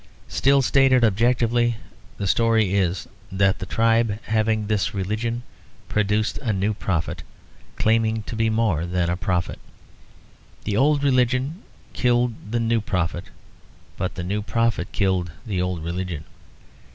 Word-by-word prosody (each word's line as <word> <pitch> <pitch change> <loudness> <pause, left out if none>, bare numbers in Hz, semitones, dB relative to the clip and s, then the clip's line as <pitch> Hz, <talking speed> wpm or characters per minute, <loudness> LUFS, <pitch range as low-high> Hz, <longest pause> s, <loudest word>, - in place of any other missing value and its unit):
Still 140 0 +3
stated 130 -1 +4
objectively, 120 +2 +2 0.4
the 100 - -3
story 110 -1 +2
is 90 -4 0 0.2
that 95 0 +2
the 95 - -5
tribe 115 -2 +2
having 110 0 +1
this 105 -1 -1
religion 110 +5 -2 0.5
produced 105 +1 0
a 120 -6 -1
new 100 +2 0
prophet, 90 -5 -2 0.5
claiming 110 0 +1
to 115 - -6
be 110 0 +1
more 110 -7 +1
than 90 -1 0
a - - 0
prophet. 90 -1 -2 1.0
The 105 - -2
old 145 +4 +3
religion 130 - +1 0.3
killed 120 -1 +2 0.2
the 120 +2 0
new 115 0 +1
prophet; 90 -3 -2 0.7
but 90 - -3
the 90 - -4
new 100 +4 -2
prophet 110 -2 0
killed 95 -4 0
the 95 -5 -1
old 90 -3 -2
religion. 85 -2 -4
110 Hz, 135 wpm, -23 LUFS, 95-115 Hz, 1.0 s, stated